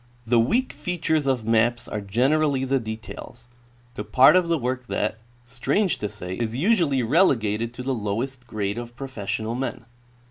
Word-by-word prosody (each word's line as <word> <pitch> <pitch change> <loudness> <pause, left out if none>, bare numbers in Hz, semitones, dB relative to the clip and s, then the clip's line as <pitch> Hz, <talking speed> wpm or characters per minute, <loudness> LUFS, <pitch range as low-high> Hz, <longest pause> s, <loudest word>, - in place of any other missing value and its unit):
The 120 0 +3
weak 235 - +1
features 160 -4 -1
of 130 -5 0
maps 115 +2 +2
are 105 - -4
generally 135 +7 +1
the 135 +1 +1
details, 110 +1 -8 0.5
the 105 - -5
part 130 - +6
of 180 -2 +3
the 170 0 +2
work 130 -1 -3
that, 110 0 -2 0.3
strange 175 - 0
to 105 - -2
say, 90 0 -6
is 115 0 -2
usually 165 - +2
relegated 115 - +2
to 125 - -6
the 135 +1 -1
lowest 120 +4 -3
grade 100 -1 -2
of 120 0 -8
professional 115 -4 -4
men. 125 0 -4
120 Hz, 165 wpm, -24 LUFS, 110-135 Hz, 0.5 s, part